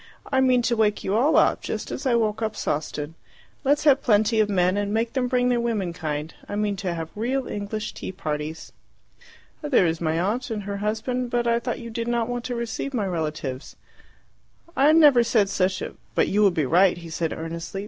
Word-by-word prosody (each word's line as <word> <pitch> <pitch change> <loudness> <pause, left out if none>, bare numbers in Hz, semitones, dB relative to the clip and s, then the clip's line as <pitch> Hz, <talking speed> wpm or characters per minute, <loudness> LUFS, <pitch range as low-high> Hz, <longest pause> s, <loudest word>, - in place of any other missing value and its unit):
"I 265 -1 +3
mean 255 -2 +3
to 235 0 +1
wake 215 -2 +1
you 190 - -1
all 255 +9 +3
up, - - +3
just - - -4
as 270 - -3
I 245 - +3
woke 220 -1 0
up 215 -1 -2
Sawston. 150 0 -3 0.5
Let's 290 +2 +2
have 280 -2 +5
plenty 220 0 +3
of 215 -1 +3
men 185 -1 +2
and 205 0 -1
make 225 +2 0
them 260 -2 0
bring 250 0 +2
their 245 -1 +2
womenkind. 170 -9 -3 0.2
I - - -3
mean 205 -1 0
to 180 -2 -3
have 165 -1 -5
real 255 +5 -1
English 210 +1 -4
tea - - -6
parties." 155 -3 -5 0.9
"There 290 - +3
is 165 0 -1
my 160 0 0
aunt 220 +9 -1
and 215 -2 -3
her 200 0 -4
husband; 225 +4 -2
but 240 0 0
I 235 0 +2
thought 235 - -3
you 235 0 -8
did 230 +1 -3
not 235 -1 0
want 245 -1 -3
to 250 -1 -3
receive 235 +3 -4
my 215 -4 0
relatives." 155 -7 -4 1.0
"I 280 +3 +5
never 295 -7 +6
said 220 -4 +2
such 185 0 0
a - - -6
" - - -35
"But - - +3
you 210 - +2
would 195 -4 +4
be 155 - +1
right," 180 +6 +4
he 170 -1 -10
said 160 0 -2
earnestly. 165 +4 -5
210 Hz, 215 wpm, -24 LUFS, 175-240 Hz, 1.0 s, never